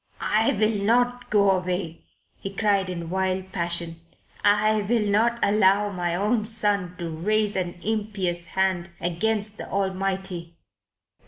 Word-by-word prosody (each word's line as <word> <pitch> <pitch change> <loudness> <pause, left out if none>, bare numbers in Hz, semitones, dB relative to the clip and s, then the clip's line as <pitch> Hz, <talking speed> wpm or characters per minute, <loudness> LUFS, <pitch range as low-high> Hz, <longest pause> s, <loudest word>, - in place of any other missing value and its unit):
"I 220 +1 +3
will 215 0 +1
not 245 +3 +1
go 200 -2 +4
away," 180 -3 -2 0.3
he 195 - -5
cried 195 -2 +1
in 170 -2 -5
wild 190 0 -1
passion. 170 -2 -3 0.4
"I 210 +1 +3
will 215 +1 +1
not 220 +4 +2
allow 205 0 +3
my 175 -2 -1
own 210 +4 +1
son 205 -5 +1
to 170 -3 -4
raise 205 +6 0
an 175 -2 -3
impious 200 -5 -1
hand 190 -2 0
against 210 +5 -1
the - - -7
Almighty." 190 -3 -2
195 Hz, 135 wpm, -25 LUFS, 180-215 Hz, 0.4 s, go